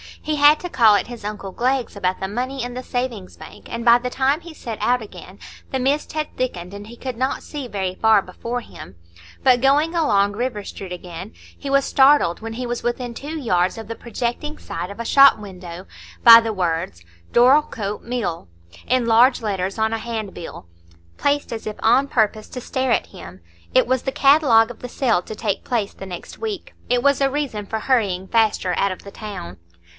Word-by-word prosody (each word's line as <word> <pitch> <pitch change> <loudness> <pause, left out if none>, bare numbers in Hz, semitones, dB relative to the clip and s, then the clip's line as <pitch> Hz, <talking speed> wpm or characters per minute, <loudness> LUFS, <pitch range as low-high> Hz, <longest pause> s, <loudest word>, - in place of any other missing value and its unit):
He 305 - -1
had 295 +1 +6
to 355 - -5
call 225 -8 +5
at - - 0
his 240 -3 -9
uncle 205 -2 -5
Glegg's 255 +3 -1
about 185 -2 -1
the 190 - -3
money 255 +5 -3
in 245 0 -5
the 255 +1 -6
Savings 245 -8 -4
Bank, - - -13
and 235 +1 -4
by 235 0 +7
the 250 +1 -3
time 270 +5 +1
he 340 -1 -11
set 230 -7 -7
out 250 0 +1
again 185 -2 -11 0.3
the 265 - -1
mist 275 +4 0
had 310 -1 -3
thickened, 180 -8 -3
and 205 +1 -9
he 235 - -11
could 255 -1 -6
not 260 +2 -1
see 285 -4 -6
very 190 -4 -3
far 220 -1 +4
before 235 +6 -5
him; 95 - -12 0.5
but 250 -2 +5
going 290 +5 +3
along 205 - +2
River 220 -1 -3
Street 195 -1 -8
again, 180 +2 -8 0.2
he 280 - -6
was 275 0 +3
startled, 270 -11 +4
when 225 0 -6
he 250 +2 -4
was 240 0 -3
within 240 0 -3
two 295 +6 -6
yards 185 -8 +1
of 225 -2 -8
the 230 - -5
projecting 240 +6 -4
side 165 +2 -6
of 200 - -10
a 235 - -4
shop 275 +1 +7
window, 185 -3 -9 0.4
by 230 -1 +11
the 225 -1 -2
words 165 - -2 0.3
"Dorlcote 240 -5 +3
Mill" 230 - -3 0.4
in 255 -1 +2
large 235 +3 +4
letters 195 -2 -2
on 220 0 +1
a 225 - -1
hand 220 -3 -5
bill, 165 - -9 0.5
placed 285 0 0
as 225 -2 -5
if 215 - -4
on 255 +5 +4
purpose 215 -4 0
to 250 - -7
stare 260 +1 -1
at - - +1
him. 90 +1 -12 0.3
It - - +6
was 260 0 0
the 270 - -1
catalogue 270 -6 +4
of 235 - -13
the 250 - -7
sale 235 -8 +1
to 215 - -8
take 205 -3 -2
place 225 -5 -2
the 195 - -9
next 175 -2 -9
week; 430 -5 -5 0.2
it 245 0 +2
was 280 0 +3
a 275 - +3
reason 265 -8 -3
for 220 - -3
hurrying 200 -8 0
faster 215 -5 +1
out 200 - +1
of 185 - -8
the 200 - -10
town. 195 - -8
230 Hz, 210 wpm, -21 LUFS, 200-260 Hz, 0.5 s, by